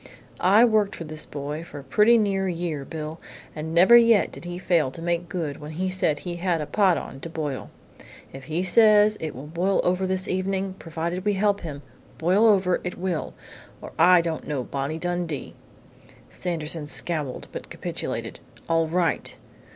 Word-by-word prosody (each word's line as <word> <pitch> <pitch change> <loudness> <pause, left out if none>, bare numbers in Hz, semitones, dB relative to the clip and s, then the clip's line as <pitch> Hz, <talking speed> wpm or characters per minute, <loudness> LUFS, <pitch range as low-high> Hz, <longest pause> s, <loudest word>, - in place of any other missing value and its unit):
"I 205 +6 +6
worked 215 -3 +1
with 165 -2 -7
this 155 -1 -3
boy 145 +2 -5
for 145 -4 -10
pretty 210 - +4
near 195 -3 +1
a - - 0
year, 165 -4 -3
Bill, 155 +1 -6 0.3
and 155 +1 -5
never 180 +8 +7
yet 230 -3 +5
did - - -11
he 175 0 -5
fail 170 -6 +1
to 135 - -11
make 170 +1 -2
good 165 -6 -3
when 150 +1 -7
he 185 +3 -2
said 170 -5 +1
he 175 +2 -5
had 175 -1 0
a 150 - -3
pot 190 -1 +3
on 135 - -7
to 165 - -7
boil. 150 -4 -4 0.6
If 135 0 -9
he 160 +5 -2
says 210 +2 +5
it 160 -1 -4
will 130 +3 -8
boil 175 +5 0
over 185 +1 +1
this 185 0 -1
evening, 190 +1 -1
provided 170 +3 -4
we 205 0 +1
help 200 +1 +1
him, 145 -4 -7 0.3
boil 185 +7 +3
over 190 -4 +3
it 180 - -5
will, 175 -3 -3 0.4
or - - -9
I 180 -1 +7
don't 165 -1 -4
know 140 -4 -2
Bonnie 140 +5 -3
Dundee!" 175 -3 -3 0.8
Sanderson 165 -3 -4
scowled 150 -4 -2
but - - -8
capitulated. - - -4 0.3
"All 165 -1 +2
right! 170 -1 0
175 Hz, 180 wpm, -25 LUFS, 155-190 Hz, 0.8 s, never